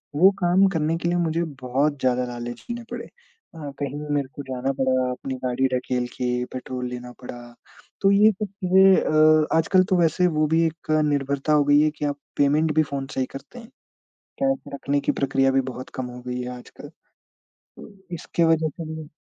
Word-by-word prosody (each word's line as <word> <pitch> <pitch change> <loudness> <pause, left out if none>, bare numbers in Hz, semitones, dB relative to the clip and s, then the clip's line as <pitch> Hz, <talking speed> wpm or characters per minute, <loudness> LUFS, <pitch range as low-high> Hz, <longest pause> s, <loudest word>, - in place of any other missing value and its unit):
वो 185 +6 +6
काम 185 +3 +4
करने 160 +1 0
के 170 +1 -2
लिए 175 - +1
मुझे 170 0 0 0.2
बहुत 140 +3 0
ज़्यादा 125 -1 +1
लाले 120 0 -5
झेलने 235 - -7
पड़े। - - -5
अ, 455 - -13
कहीं 145 +1 -3 0.2
मेरे 140 -2 0
को 145 - -6
जाना 130 0 -2
पड़ा, 130 -1 +2
अपनी 130 +1 -5
गाड़ी 130 +1 +1
ढकेल 125 -1 -2
के 125 0 -1
पेट्रोल 125 -1 -5
लेना 125 0 -7
पड़ा, 120 -1 -9 0.5
तो 195 - +4
ये 210 +2 +6
सब 210 +2 -4
चीज़ें 190 -1 +4
अ, 155 0 +4
आजकल 185 +3 +4
तो 185 - +3
वैसे 170 +2 +3
वो 155 -2 +1
भी 165 +2 +2
एक 160 0 -4
निर्भरता 140 0 0
हो 150 - +5
गयी 145 +1 +5
है 155 - +3
कि 150 - -2
आप 145 0 -2 0.2
पेमेंट 150 +2 +2
भी 155 - +5
फ़ोन 140 -2 -5
से - - -3
ही 130 - +1
करते 245 - -10
हैं, 230 - -12 0.8
कैश 270 0 +2 0.2
रखने 140 +1 -1
की 140 - 0
प्रक्रिया 135 -1 +1
भी 135 - +3
बहुत 130 +1 -9
कम 130 -1 -3
हो 125 - -9
गई 125 0 -3
है 125 - -5
आजकल। 125 - -12 0.7
तो - - -15 0.3
इसके 170 +1 -1
वजह 160 -1 +3
से 160 +1 -7
म - - -16
145 Hz, 200 wpm, -23 LUFS, 130-165 Hz, 0.8 s, वो